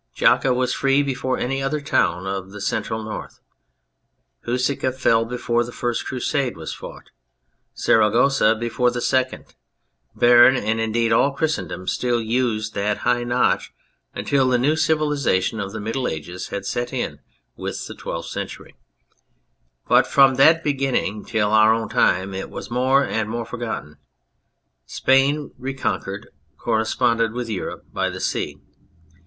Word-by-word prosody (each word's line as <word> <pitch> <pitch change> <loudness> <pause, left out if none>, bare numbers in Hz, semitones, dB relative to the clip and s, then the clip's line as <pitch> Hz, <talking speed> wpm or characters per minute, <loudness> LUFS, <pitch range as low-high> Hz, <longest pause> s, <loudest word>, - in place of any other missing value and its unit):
Jaca 135 - +3
was 125 0 +1
free 135 +1 +2
before 130 -2 -2
any 135 +2 -2
other 135 +3 -1
town 95 - 0
of 95 -1 -4
the 105 +1 -9
Central 110 +2 -2
North, 110 0 -7 1.1
Huesca 125 +2 0
fell 115 -3 +2
before 120 0 -1
the 120 - -8
first 120 -1 -3
Crusade 130 - -1
was 80 - -6
fought, - - -11 0.6
Saragossa 110 +1 +3
before 120 +2 0
the 120 0 -3
second. 130 +1 -1 0.7
Beam, 120 +2 +7
and 110 -2 -1
indeed 115 +1 0
all 140 +5 +3
Christendom, 95 - -3
still 120 +4 0
used 110 -2 -1
that 105 +1 -2
high 120 0 +2
notch 120 +1 0 0.4
until 135 -2 +1
the 125 - +3
new 140 +6 +2
civilisation 150 -10 +1
of 100 -2 -4
the 110 - -6
Middle 115 +5 -2
Ages 90 +4 -5
had 100 -1 -5
set 120 +4 -2
in - - -3 0.4
with - - -5
the - - -8
Twelfth 85 0 -6
Century, - - -7 1.1
but - - +4
from 135 -1 +5
that 160 +5 +5
beginning 135 -7 -1
till 105 -2 0
our 110 0 +6
own 115 -1 -4
time 95 +2 +2
it 95 0 -5
was - - -8
more 130 +3 +3
and 110 -1 -2
more 115 +1 -3
forgotten. 110 -13 -6 0.9
Spain, 135 +2 +2
reconquered, 125 -6 -4 0.3
corre 110 -1 0
sponded 115 -1 +1
with 120 -2 -4
Europe 100 - -5
by - - 0
the - - -7
sea. - - -2
120 Hz, 145 wpm, -22 LUFS, 110-130 Hz, 1.1 s, Beam